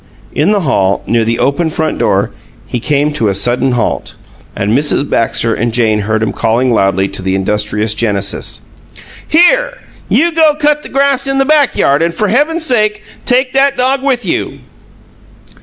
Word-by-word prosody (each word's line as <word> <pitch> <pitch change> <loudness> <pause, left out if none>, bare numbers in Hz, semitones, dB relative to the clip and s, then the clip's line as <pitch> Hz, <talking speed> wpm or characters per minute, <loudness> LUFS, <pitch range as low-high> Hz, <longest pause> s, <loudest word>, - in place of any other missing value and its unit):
In 155 +6 +1
the 205 -2 +1
hall, 100 - 0
near 115 -1 +1
the 115 +1 -1
open 140 +6 0
front 155 0 -2
door, - - +1 0.3
he 125 - -4
came 145 +4 0
to 115 -7 0
a 100 - -1
sudden 125 +5 +1
halt, 120 -3 -2 0.4
and 105 +3 0
Mrs. 145 0 +1
Baxter 115 0 0
and 120 +1 -1
Jane 110 -2 +1
heard 110 +1 -1
him 110 - -2
calling 120 +2 0
loudly 95 -2 +1
to - - -4
the 95 0 -1
industrious 105 +2 0
Genesis: 100 -3 -2 0.7
"Here! - - +3 0.3
You 335 +4 +2
go 315 -2 +3
cut 300 0 +1
the - - -10
grass 275 0 +1
in 270 0 -1
the 270 - +2
back 295 -2 +2
yard, 140 +2 +2
and 170 0 0
for 210 +3 0
Heaven's 315 - +1
sake, 215 -5 0 0.2
take 255 +1 +2
that 275 +1 +2
dog 260 +2 +1
with 260 -5 -1
you!" 170 - -3
150 Hz, 175 wpm, -12 LUFS, -, 0.7 s, Here